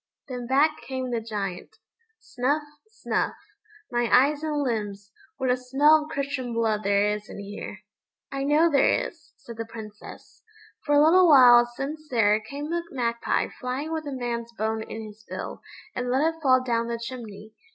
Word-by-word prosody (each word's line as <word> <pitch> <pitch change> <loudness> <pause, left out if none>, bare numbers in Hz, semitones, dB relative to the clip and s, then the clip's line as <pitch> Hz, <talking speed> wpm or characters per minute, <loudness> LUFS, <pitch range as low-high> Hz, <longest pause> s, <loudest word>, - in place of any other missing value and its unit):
Then 250 -3 -6
back 295 +4 +2
came 260 -1 -3
the 235 -1 -1
Giant. 200 -5 -5 0.4
Snuff 285 - -1 0.2
snuff! 440 +1 -2 0.6
"My 240 -1 0
eyes 285 +3 +4
and 300 -2 -1
limbs, 205 -5 -3 0.3
what 260 -1 +1
a - - +3
smell 285 +5 +4
of - - -13
Christian 275 -4 -3
blood 220 -2 +1
there 200 0 +2
is 210 0 -10
in - - -8
here!" 200 0 -8 0.5
"I 275 0 -3
know 300 +4 +4
there 290 -4 +3
is," - - -18
said 235 -1 -11
the 225 - -4
Princess; 220 -2 -11 0.4
"for 290 -1 +2
a 290 - +6
little 355 +2 +6
while 245 -4 +8
since 295 +6 -6
there 215 -3 +3
came 285 +8 -6
a 345 - 0
magpie 235 -3 -1
flying 265 +6 -3
with 315 -2 -4
a - - -4
man's 235 -2 -4
bone 220 0 -2
in 220 0 -7
his 215 0 -13
bill, - - -6 0.3
and 245 0 -2
let 290 +6 +2
it 325 - -18
fall 255 -3 +4
down 235 -2 0
the 235 0 -2
chimney. 225 -3 -8
250 Hz, 175 wpm, -26 LUFS, 225-285 Hz, 0.6 s, while